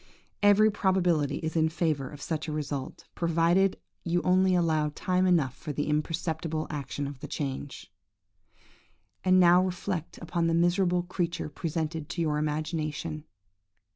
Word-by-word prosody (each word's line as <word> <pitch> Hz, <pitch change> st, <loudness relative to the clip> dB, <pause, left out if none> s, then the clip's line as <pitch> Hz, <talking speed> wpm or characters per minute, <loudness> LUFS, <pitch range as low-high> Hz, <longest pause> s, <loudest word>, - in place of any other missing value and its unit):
"Every 205 Hz, +1 st, +6 dB
probability 180 Hz, -8 st, +1 dB
is 160 Hz, +1 st, -3 dB
in 160 Hz, -1 st, +3 dB
favour 155 Hz, -5 st, -1 dB
of 145 Hz, -1 st, -10 dB
such 160 Hz, -1 st, -3 dB
a -, -, -3 dB
result, 145 Hz, -3 st, -4 dB
provided 170 Hz, +3 st, +2 dB, 0.3 s
you 175 Hz, 0 st, 0 dB
only 185 Hz, 0 st, +3 dB
allow 160 Hz, -3 st, +2 dB
time 185 Hz, 0 st, +1 dB
enough 155 Hz, -8 st, +2 dB
for 150 Hz, -, -6 dB
the 145 Hz, +1 st, -2 dB
imperceptible 155 Hz, +1 st, -1 dB
action 145 Hz, -1 st, -4 dB
of 140 Hz, -1 st, -7 dB
the -, -, -7 dB
change. 135 Hz, -7 st, -5 dB, 1.3 s
"And 185 Hz, 0 st, +5 dB
now 180 Hz, 0 st, +6 dB
reflect 180 Hz, -2 st, -3 dB
upon 170 Hz, 0 st, -1 dB
the 165 Hz, -, +2 dB
miserable 175 Hz, +1 st, +2 dB
creature 175 Hz, -2 st, -3 dB
presented 160 Hz, 0 st, -3 dB
to 160 Hz, -, -3 dB
your 150 Hz, -2 st, 0 dB
imagination! 155 Hz, 0 st, -3 dB
165 Hz, 140 wpm, -28 LUFS, 150-180 Hz, 1.3 s, Every